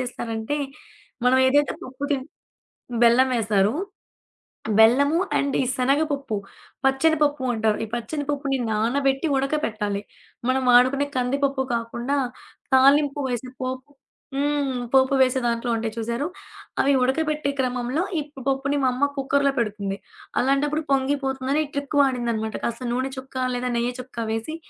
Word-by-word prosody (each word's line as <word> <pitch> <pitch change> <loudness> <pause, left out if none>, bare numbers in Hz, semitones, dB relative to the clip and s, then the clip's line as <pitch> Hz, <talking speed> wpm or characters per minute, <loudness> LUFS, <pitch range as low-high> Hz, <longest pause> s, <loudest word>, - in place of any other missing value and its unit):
చేస్తారంటే, 235 +1 -3 0.7
మనం 255 +1 +5
ఏదైతే 290 +2 +3
పప్పు 260 +2 -10
చేన్ 265 0 -2 0.8
బెల్లం 250 +3 +5
వేస్తారు. 210 -1 +2 1.1
బెల్లము 280 +9 +5 0.2
అండ్ 280 -1 0
ఈ - - -1
శనగపప్పు, 275 -2 0 0.5
పచ్చనపప్పు 290 0 +2
అంటారు. 220 -1 +1
ఈ - - -11
పచ్చన 240 +6 -3
పప్పుని 275 -2 0
నానబెట్టి 270 +7 +1
ఉడకపెట్టాలి. 225 -8 -1 0.5
మనం 260 0 +2
వాడుకునే 260 +4 +5
కందిపప్పు 275 +2 0
కాకుండా, 235 +4 -2 0.6
తాలింపు 280 +2 +4
వేసే 245 +1 -3
పోపు 260 +2 -4 0.5
హ్మ్. 285 -2 0
పోపు 265 +1 +5
వేసే 260 0 +3
దాంట్లో 235 0 0
ఉంటాయి 225 -1 -3
చూసారు. 235 +5 -2 0.6
అవి 280 +1 +3
ఉడకబెట్టే 300 +2 0
క్రమంలో 250 +4 0 0.2
ఈ - - 0 0.3
పప్పుని 275 +1 0
మా - - +4
అమ్మ 275 +3 +2
కుక్కర్‌లో 275 +1 +2
పెడుతుంది. 200 -3 -2 0.4
అలాంటప్పుడు 290 +4 +1
పొంగిపోతుందని 270 +1 0
ఈ - - -13
ట్రిక్ 285 +1 -3
వాడిందనమాట. 235 -5 0
కాస్త 235 +1 -3
నూనె 260 +2 -1
చుక్కా, 260 0 -4
లేదా 250 0 -2
నెయ్య 240 +1 0
చుక్క 235 -3 -5
వేసి 225 +9 -3
265 Hz, 125 wpm, -24 LUFS, 235-280 Hz, 1.1 s, మనం